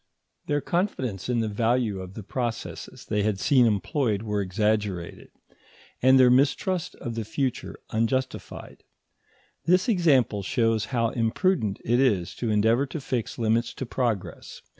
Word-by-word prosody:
Their 145 0 0
confidence 130 - -2
in 120 -2 +1
the 110 - -1
value 115 -1 0
of 95 +1 -9
the 110 - -7
processes 120 +3 -5
they 105 -1 0
had 105 -2 0
seen 125 0 +4
employed 110 - 0
was 105 -2 -1
exaggerated, 105 -2 -2 0.7
and 130 +1 +6
their 125 -1 +6
mistrust 160 +7 +1
of 120 -3 -6
the 115 0 -3
future 130 +4 -3
unjustified. 130 +4 -3 0.8
This 180 +4 +3
example 145 - +3
shows 115 +2 +1
how 115 +1 0
imprudent 115 - 0
it 120 +2 +2
is 105 -10 +1
to 120 - -2
endeavour 110 +6 +2
to 150 +4 -5
fix 125 -4 -3
limits 115 +1 0
to 130 - -4
progress. 115 -5 -3
115 Hz, 140 wpm, -26 LUFS, 105-130 Hz, 0.8 s, and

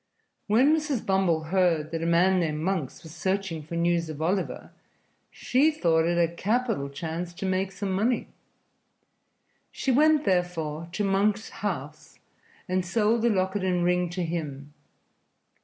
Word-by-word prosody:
When 255 +9 +4
Mrs. 300 -7 -2
Bumble 190 -5 +2
heard 165 -3 +1
that 165 -1 -3
a 165 - -1
man 180 +3 +4
named 155 -3 -1
Monks 165 -6 -2
was 160 -1 -11
searching 190 -4 -2
for 155 +3 -7
news 170 -1 +1
of 155 -2 -7
Oliver, 180 +4 -2 0.6
she 275 +5 +2
thought 165 - +2
it 170 0 +1
a 170 -1 +2
capital 215 - -1
chance 165 +4 -5
to 195 - -5
make 190 0 0
some 190 +1 -4
money. 220 +6 0 1.4
She 270 - -1
went, 305 +3 +4
therefore, 170 -3 -1
to 205 - -1
Monks's 200 +2 +1
house 155 -7 -6 0.5
and 185 0 0
sold 215 +5 +1
the 235 - +3
locket 190 -1 0
and 180 -2 +1
ring 180 0 +1
to 180 +1 -3
him. 150 -4 -5
180 Hz, 150 wpm, -26 LUFS, 165-200 Hz, 1.4 s, When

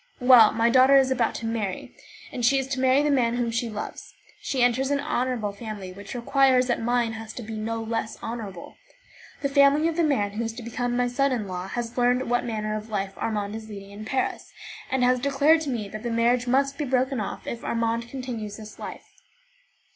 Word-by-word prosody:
Well, 250 -4 +7
my 230 +1 +2
daughter 260 +2 +6
is 265 -1 +3
about 240 -3 +1
to 230 - -5
marry. 220 -4 -3 0.5
She 245 +3 +4
is 270 - 0
to 265 -1 -2
marry 260 +2 +4
the 295 - +2
man 240 -4 +2
whom 240 -1 -1
she 230 +1 -1
loves; 210 -1 -7 0.3
she 260 -3 0
enters 250 +2 +2
an 285 0 +1
honourable 250 -7 -1
family, 200 -3 -7
which 200 +6 -9
requires 255 +1 +3
that 240 -2 -1
mine 240 -1 +1
has 220 0 -8
to 245 - -7
be 220 +1 -7
no 225 +1 -3
less 225 0 -3
honourable. 210 -6 -7 0.7
The 280 - +1
family 280 +2 +4
of 330 0 -2
the 340 - +3
man 255 -10 +1
who 215 +3 -3
is 225 -1 -3
to 240 +1 -8
become 245 +1 -2
my 245 0 +2
son 275 +3 +1
in 225 -5 -2
law 180 0 -5
has 240 +4 -4
learned 245 0 +2
what 245 - +1
manner 215 -2 -2
of 215 +1 -6
life 195 -2 -2
Armand 210 -1 -3
is 220 0 -8
leading 200 -1 -9
in 205 +1 -9
Paris, 260 +4 -2 0.4
and 265 -1 +1
has 250 0 +3
declared 280 +4 +3
to 300 - -3
me 230 -5 -3
that 215 +1 -7
the 240 - -3
marriage 235 +2 +2
must 275 +3 +1
be 295 - -1
broken 260 0 0
off 210 - -5
if 235 - -5
Armand 230 0 -1
continues 235 -6 -5
this 215 -1 -11
life. - - -8
240 Hz, 215 wpm, -25 LUFS, 220-260 Hz, 0.7 s, Well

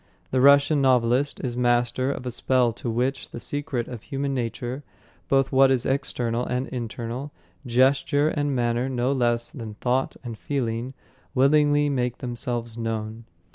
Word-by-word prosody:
The 130 - +2
Russian 140 +2 +5
novelist 130 +1 +2
is 125 -3 -2
master 120 +2 +1
of 130 - -6
a 125 - -2
spell 125 0 +2
to 120 - -5
which 125 +4 -1
the - - -7
secret 145 -2 -3
of 120 -4 -7
human 140 +2 -3
nature 125 +2 -3 0.5
both 135 -1 +2
what 135 0 +5
is 130 -3 +1
external 120 -3 -1
and 125 +1 -2
internal, 120 +3 -5 0.4
gesture 135 +4 +3
and 145 -3 -1
manner 120 +1 0
no 125 0 0
less 120 -3 0
than 115 -6 -8
thought 125 +4 0
and 115 -3 -7
feeling 125 -2 -3 0.4
willingly 145 +2 +4
make 125 -3 -1
themselves 120 -2 -4
known... 110 0 -4
125 Hz, 150 wpm, -25 LUFS, 120-135 Hz, 0.5 s, Russian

